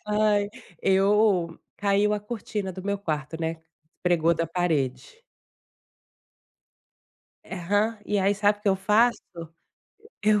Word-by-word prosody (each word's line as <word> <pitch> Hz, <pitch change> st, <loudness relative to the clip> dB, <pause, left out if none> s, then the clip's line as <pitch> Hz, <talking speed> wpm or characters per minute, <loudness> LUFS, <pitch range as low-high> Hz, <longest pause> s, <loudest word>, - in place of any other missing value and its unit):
ai, 210 Hz, -1 st, +2 dB, 0.3 s
eu, 195 Hz, -3 st, +3 dB, 0.2 s
caiu 200 Hz, +1 st, +2 dB
a 210 Hz, -, 0 dB
cortina 210 Hz, -2 st, -5 dB
do 185 Hz, -, -8 dB
meu 200 Hz, +1 st, -2 dB
quarto, 160 Hz, -4 st, -4 dB
né? 160 Hz, 0 st, -3 dB, 0.4 s
Despregou 170 Hz, -2 st, +3 dB
da 165 Hz, +1 st, -1 dB
parede. 155 Hz, -, -1 dB, 2.3 s
Aham. 205 Hz, +5 st, -1 dB
E 205 Hz, -, 0 dB
aí, 195 Hz, +1 st, +2 dB
sabe 205 Hz, 0 st, +2 dB
o 210 Hz, -, -29 dB
que 210 Hz, -, +1 dB
eu 190 Hz, -, +3 dB
faço? 215 Hz, +5 st, +3 dB, 1.0 s
Eu 210 Hz, 0 st, +4 dB
200 Hz, 120 wpm, -26 LUFS, 170-210 Hz, 2.3 s, Eu